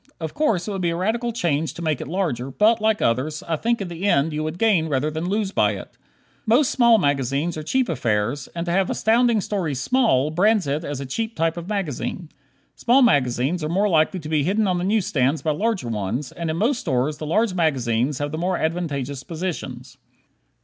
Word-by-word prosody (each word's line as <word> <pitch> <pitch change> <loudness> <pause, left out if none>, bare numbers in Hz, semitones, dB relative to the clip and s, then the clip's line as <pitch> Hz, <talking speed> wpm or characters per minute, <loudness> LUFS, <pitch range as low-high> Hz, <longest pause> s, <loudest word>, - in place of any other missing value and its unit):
Of 160 -2 -5
course, 220 - 0
it - - -2
would 195 -2 -3
be 175 - +1
a 170 - -2
radical 225 +7 -1
change 160 -8 -1
to 170 - -7
make 155 -4 -1
it - - -6
larger, 155 -7 -2
but, 215 - +3
like 220 0 +1
others, 135 +7 0
I 165 - -1
think 230 +7 0
in 195 - -3
the 175 +2 -5
end 155 -3 +2
you 155 +1 -2
would 155 +2 -4
gain 190 -7 +2
rather 145 +2 0
than 160 +3 -3
lose 205 -1 -1
by - - +2
it. - - -9 0.5
Most 245 +5 +4
small 235 -3 +5
magazines 140 - 0
are 155 - -4
cheap 255 +11 0
affairs, 120 -3 -1
and 170 0 -3
to 170 - -2
have 190 +1 +1
Astounding 230 0 +2
Stories 170 -10 -2
small 155 - +2
brands 205 +4 +3
it 145 +3 -2
as 145 -3 -4
a - - -5
cheap 225 - -3
type 165 0 0
of 170 +2 -7
magazine. 175 - -3 0.5
Small 255 +3 +4
magazines 145 - +2
are 150 - -2
more 195 +5 +2
likely 165 +2 +2
to 150 - -8
be 155 -1 +1
hidden 200 +7 +1
on 180 -1 +1
the - - -2
newsstands 160 -9 +1
by 155 - +1
larger 200 - -1
ones, 115 +5 -3
and 170 -1 -4
in 160 - -2
most 240 +6 +1
stores 135 +4 -1
the 155 - -5
large 215 +5 +1
magazines 135 -6 0
have 145 +1 -3
the 155 - -4
more 180 +1 0
advantageous 145 -5 -2
positions. 135 -7 -6
165 Hz, 215 wpm, -22 LUFS, 145-205 Hz, 0.5 s, small